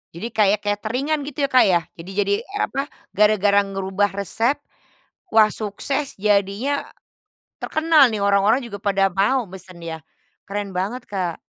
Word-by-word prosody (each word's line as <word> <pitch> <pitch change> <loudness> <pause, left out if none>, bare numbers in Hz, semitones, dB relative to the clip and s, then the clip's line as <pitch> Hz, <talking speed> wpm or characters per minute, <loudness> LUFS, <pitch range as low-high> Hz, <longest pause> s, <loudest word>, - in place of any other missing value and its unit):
Jadi 175 +7 -4
kayak 210 -1 +3
kateringan 250 +9 -1
gitu 280 0 -2
ya, - - -25
Kak, 255 - +6
ya, 180 -3 +4 0.2
jadi 170 +3 -10
jadi 200 +1 0
e 390 - -12
apa, 275 - -1 0.3
gara-gara 205 -1 +4
ngerubah 195 +1 -1
resep, 225 +7 -1 0.7
wah 220 -1 +6
sukses, 265 +7 -3
jadinya 205 +7 0 0.7
terkenal 315 -4 +4
nih, 210 - -2
orang-orang 200 +5 +3
juga 210 -4 -7
pada 195 -2 +2
mau 235 +7 +2
pesen 185 -2 -11
ya? 165 -1 -6 0.5
Keren 205 0 -4
banget, 205 +7 -3
Kak. 180 -4 -3
205 Hz, 145 wpm, -22 LUFS, 195-255 Hz, 0.7 s, Kak